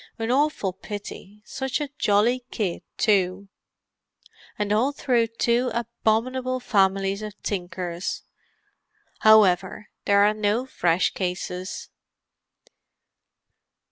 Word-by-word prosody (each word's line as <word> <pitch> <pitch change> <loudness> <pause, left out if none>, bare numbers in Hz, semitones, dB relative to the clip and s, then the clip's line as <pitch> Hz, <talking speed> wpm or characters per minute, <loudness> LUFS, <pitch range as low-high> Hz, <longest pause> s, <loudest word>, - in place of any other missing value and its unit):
An 225 0 -2
awful 270 -8 +1
pity; 205 +1 -9
such 265 +1 -3
a 290 -2 -4
jolly 225 +5 +2
kid, 195 -7 -2 0.2
too. 195 -1 +1 1.1
And 210 0 0
all 240 +7 +2
through 245 -5 +1
two 235 +2 +1
abominable 235 +2 -1
families 195 -3 +1
of 210 -1 -8
tinkers! 180 -2 -4 1.0
However, 205 -2 +4 0.2
there 200 0 +5
are 210 +1 +4
no 215 +3 0
fresh 175 -8 +1
cases." 180 0 -4
210 Hz, 95 wpm, -24 LUFS, 190-235 Hz, 1.1 s, there